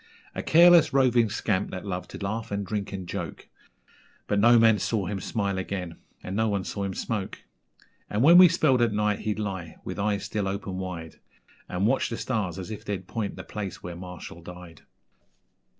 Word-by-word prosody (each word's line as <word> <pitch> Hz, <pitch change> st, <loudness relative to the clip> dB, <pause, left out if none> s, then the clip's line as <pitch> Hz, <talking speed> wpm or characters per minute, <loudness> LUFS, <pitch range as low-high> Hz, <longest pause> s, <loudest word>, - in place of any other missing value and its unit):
A -, -, -3 dB
careless, 170 Hz, -2 st, +6 dB
roving 125 Hz, -4 st, +4 dB
scamp, 105 Hz, -2 st, -1 dB
that 90 Hz, +1 st, -6 dB
loved 90 Hz, -2 st, -4 dB
to -, -, -8 dB
laugh 110 Hz, +3 st, -4 dB
and 100 Hz, 0 st, -2 dB
drink 100 Hz, 0 st, -3 dB
and 95 Hz, -2 st, -6 dB
joke, -, -, -6 dB, 0.8 s
But 100 Hz, -, 0 dB
no 120 Hz, +3 st, +6 dB
man 115 Hz, -2 st, +5 dB
saw 105 Hz, -5 st, -1 dB
him 100 Hz, +1 st, -3 dB
smile 100 Hz, -1 st, -2 dB
again 90 Hz, -3 st, -4 dB, 0.3 s
(and 95 Hz, -, -5 dB
no 110 Hz, +1 st, +1 dB
one 100 Hz, -2 st, -1 dB
saw 100 Hz, +2 st, -4 dB
him 95 Hz, -1 st, -4 dB
smoke), 105 Hz, -4 st, -4 dB, 0.7 s
And, 105 Hz, +4 st, 0 dB
when 170 Hz, +5 st, +9 dB
we 180 Hz, -1 st, +9 dB
spelled 145 Hz, -6 st, +3 dB
at 115 Hz, -2 st, +2 dB
night, 105 Hz, 0 st, +1 dB
he'd 105 Hz, -1 st, -2 dB
lie 95 Hz, -6 st, -4 dB
with 95 Hz, -, -6 dB
eyes 100 Hz, -1 st, 0 dB
still 100 Hz, 0 st, -2 dB
open 95 Hz, -1 st, -4 dB
wide, 90 Hz, -3 st, -6 dB, 0.5 s
And 90 Hz, +2 st, -1 dB
watch 130 Hz, +4 st, +2 dB
the 115 Hz, -, -4 dB
stars 100 Hz, -8 st, -2 dB
as 95 Hz, +3 st, -6 dB
if 105 Hz, -, -7 dB
they'd 95 Hz, -3 st, -4 dB
point 105 Hz, +1 st, -4 dB
the -, -, -8 dB
place 100 Hz, -3 st, -6 dB
where 90 Hz, -1 st, -6 dB
Marshall 90 Hz, -1 st, -9 dB
died. 90 Hz, -1 st, -11 dB
100 Hz, 195 wpm, -26 LUFS, 95-110 Hz, 0.8 s, when